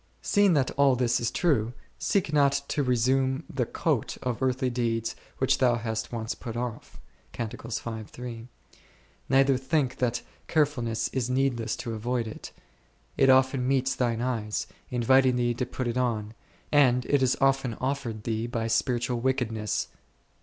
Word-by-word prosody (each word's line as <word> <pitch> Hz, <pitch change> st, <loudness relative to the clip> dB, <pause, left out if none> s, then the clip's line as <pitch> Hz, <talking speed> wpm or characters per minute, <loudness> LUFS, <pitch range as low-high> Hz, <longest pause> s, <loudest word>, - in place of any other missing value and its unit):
Seeing 205 Hz, -3 st, +4 dB
that 135 Hz, -3 st, +2 dB
all 140 Hz, -2 st, +5 dB
this 120 Hz, -1 st, +1 dB
is 120 Hz, -, 0 dB
true, 125 Hz, -9 st, +1 dB, 0.3 s
seek 185 Hz, -6 st, 0 dB
not 140 Hz, -1 st, +3 dB
to 150 Hz, -, 0 dB
resume 130 Hz, +2 st, +1 dB
the 125 Hz, -4 st, -2 dB
coat -, -, -1 dB
of 125 Hz, -1 st, -2 dB
earthly 130 Hz, 0 st, +1 dB
deeds 115 Hz, -2 st, -1 dB, 0.2 s
which 130 Hz, -, +2 dB
thou 125 Hz, -2 st, +4 dB
hast 110 Hz, -1 st, -3 dB
once 115 Hz, -1 st, -3 dB
put 120 Hz, -2 st, -7 dB
off 120 Hz, -2 st, -5 dB, 0.3 s
f; 115 Hz, -1 st, -5 dB, 1.1 s
neither 135 Hz, 0 st, +4 dB
think 130 Hz, 0 st, 0 dB
that 125 Hz, -1 st, -1 dB, 0.2 s
carefulness 135 Hz, -8 st, +1 dB
is 125 Hz, -2 st, -2 dB
needless 125 Hz, -4 st, 0 dB
to 115 Hz, -, -5 dB
avoid 120 Hz, +2 st, -1 dB
it, 110 Hz, -, -8 dB, 0.6 s
it 135 Hz, -, +4 dB
often 130 Hz, -1 st, +4 dB
meets 130 Hz, -1 st, +2 dB
thine 120 Hz, -2 st, 0 dB
eyes, 110 Hz, -4 st, -2 dB, 0.2 s
inviting 130 Hz, +1 st, +4 dB
thee 120 Hz, -1 st, +1 dB
to 120 Hz, +1 st, -3 dB
put 130 Hz, 0 st, -3 dB
it 120 Hz, +1 st, -2 dB
on, 110 Hz, -4 st, -1 dB, 0.4 s
and 125 Hz, -4 st, +4 dB
it 145 Hz, -2 st, +2 dB
is 130 Hz, -1 st, +2 dB
often 135 Hz, -3 st, +2 dB
offered 125 Hz, -5 st, -3 dB
thee 115 Hz, 0 st, -2 dB
by 115 Hz, -1 st, -2 dB
spiritual 120 Hz, +1 st, 0 dB
wickedness. 115 Hz, -4 st, -1 dB
125 Hz, 150 wpm, -27 LUFS, 115-135 Hz, 1.1 s, all